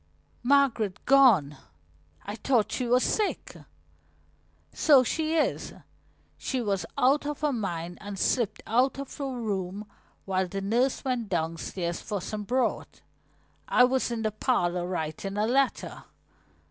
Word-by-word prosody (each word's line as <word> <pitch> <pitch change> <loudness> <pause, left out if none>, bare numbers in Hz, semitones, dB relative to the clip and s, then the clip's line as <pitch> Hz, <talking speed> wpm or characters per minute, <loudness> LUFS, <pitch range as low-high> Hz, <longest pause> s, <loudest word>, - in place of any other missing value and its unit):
"Margaret 245 -7 +2
gone? 225 - +5 0.7
I 205 - -5
thought 230 -2 +1
she 250 - -2
was 250 +2 +3
sick." 395 - -1 1.2
"So 280 -4 +5
she 315 +5 -1
is. 315 - 0 0.6
She 260 - -2
was 195 -7 -1
out 280 +3 +3
of 295 0 -4
her 300 -2 +1
mind 175 -6 -4
and 205 -1 -7
slipped 235 +2 0
out 250 +5 +2
of 275 -1 -7
her 280 - -2
room 205 -5 -3 0.4
while 190 -1 0
the 195 +2 -4
nurse 240 +8 0
went 245 -5 -2
downstairs 170 +1 -3
for 205 -2 -3
some 210 +3 -5
broth. 255 +4 -2 0.6
I 250 - +5
was 255 0 +2
in 230 -1 -3
the 215 - 0
parlor 180 -6 0
writing 180 +3 -4
a 210 - +2
letter." 265 +3 0
225 Hz, 135 wpm, -27 LUFS, 190-260 Hz, 1.2 s, gone